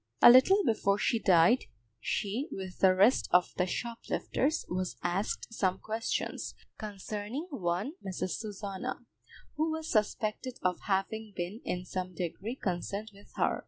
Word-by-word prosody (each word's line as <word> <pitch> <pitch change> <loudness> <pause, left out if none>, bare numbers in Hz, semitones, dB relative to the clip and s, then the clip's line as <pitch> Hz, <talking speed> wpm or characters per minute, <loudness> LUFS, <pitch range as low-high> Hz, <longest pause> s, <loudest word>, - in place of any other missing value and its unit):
A - - +11
little 380 +12 +7
before 205 -4 +2
she 230 +2 +1
died, 185 +5 +5 0.3
she, 215 - -2
with 185 -2 -6
the 185 -1 +6
rest 205 +7 +5
of 180 0 +4
the 180 - +2
shoplifters, 245 - -1
was 185 0 -2
asked 195 +5 -1
some 190 -4 +1
questions 220 +2 -3 0.2
concerning 210 - -5
one 180 0 -1
Mrs. 185 -1 -3
Susanna, 200 -3 -5 0.5
who 315 +1 +2
was 320 0 -3
suspected 215 +3 0
of 180 -1 +1
having 210 +2 -1
been 185 +7 -4
in 180 0 -3
some 185 -1 -4
degree 185 +7 -3
concerned 200 +1 -3
with 200 +1 -17
her. - - +1
205 Hz, 140 wpm, -31 LUFS, 185-230 Hz, 0.5 s, A